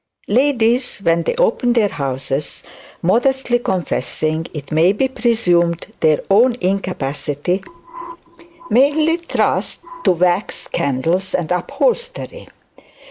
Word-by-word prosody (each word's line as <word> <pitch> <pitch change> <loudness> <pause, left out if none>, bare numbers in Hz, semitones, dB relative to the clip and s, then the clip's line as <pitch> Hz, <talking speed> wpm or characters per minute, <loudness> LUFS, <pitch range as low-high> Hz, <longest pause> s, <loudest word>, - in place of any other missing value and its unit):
Ladies, 250 0 +2
when 170 -4 +1
they - - -2
open 475 - +2
their 220 -4 +2
houses, 135 0 -4 0.4
modestly 245 +5 +2
confessing, 160 - -2
it 145 -2 -8
may 165 +5 +4
be 265 +6 +1
presumed, 180 -9 +1
their 155 -1 +3
own 235 +5 +5
incapacity, 180 -3 -2 1.1
mainly 295 +7 +3
trust 340 -1 -1 0.2
to 185 - +5
wax 180 +3 0
candles 165 +8 -1
and 175 -2 -2
upholstery. 485 - -2
190 Hz, 100 wpm, -18 LUFS, 165-250 Hz, 1.1 s, own